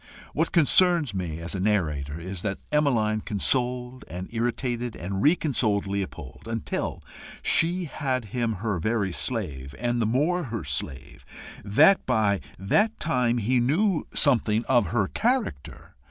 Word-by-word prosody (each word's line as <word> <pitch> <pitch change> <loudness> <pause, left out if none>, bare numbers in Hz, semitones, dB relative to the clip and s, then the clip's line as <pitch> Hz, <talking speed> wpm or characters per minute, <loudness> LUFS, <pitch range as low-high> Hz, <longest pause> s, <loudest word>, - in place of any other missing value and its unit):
What 165 +2 0
concerns 170 - +4
me 90 -5 -3
as 85 - -4
a 95 - -3
narrator 80 -7 0
is, 90 +1 -5
that 100 0 -2
Emmeline 115 -8 +2
consoled 125 +4 -1
and 90 +2 -6
irritated 120 0 -2
and 95 +2 -4
re 155 +9 +5
consoled 110 - 0
Leopold, 95 - -5
until 115 -1 -3 0.4
she 175 +2 +2
had 130 -5 -2
him 120 -2 0
her 105 -2 -2
very 105 +1 0
slave, 75 - -2
and 120 0 -1
the 110 - +1
more 155 +9 +1
her 115 -6 -4
slave 70 -1 -3 0.4
that 150 - +5
by 110 -5 +2 0.2
that 210 - +1
time 125 -6 +1
he 120 +3 +1
knew 160 - +2
something 115 -5 +2
of 120 -7 +3
her 105 +1 0
character. 235 - -2
115 Hz, 140 wpm, -26 LUFS, 95-135 Hz, 0.4 s, re